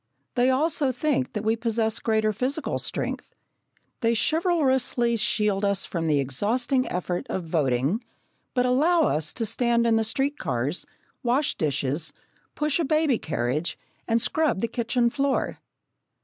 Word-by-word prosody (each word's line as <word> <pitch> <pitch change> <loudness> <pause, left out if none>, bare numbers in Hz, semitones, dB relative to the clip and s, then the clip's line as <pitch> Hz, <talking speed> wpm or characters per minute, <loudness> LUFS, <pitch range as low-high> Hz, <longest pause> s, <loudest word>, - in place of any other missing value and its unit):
They 250 +1 +3
also 285 +1 +2
think 260 0 -1
that 210 - -3
we 220 +1 +2
possess 225 -1 0
greater 220 -1 +1
physical 270 +7 -2
strength. - - -4 0.6
They 230 -1 +2
chivalrously 265 - +2
shield 210 -2 +1
us 200 -1 +1
from 165 -2 -3
the 150 -2 +3
exhausting 235 - 0
effort 180 0 -2
of 185 - -2
voting, 155 - 0 0.5
but 250 0 +3
allow 315 +7 +3
us 155 - 0
to 230 - -2
stand 235 +1 +1
in 225 -1 +4
the 225 - +2
street 275 +6 0
cars, 135 - -2 0.3
wash 260 +3 +1
dishes, 145 +1 -1 0.4
push 300 +1 0
a - - +2
baby 305 -4 +2
carriage, 140 +3 -2 0.3
and 230 0 +3
scrub 300 -5 +1
the 230 - +1
kitchen 235 0 0
floor. 280 0 -1
230 Hz, 145 wpm, -25 LUFS, 190-265 Hz, 0.6 s, in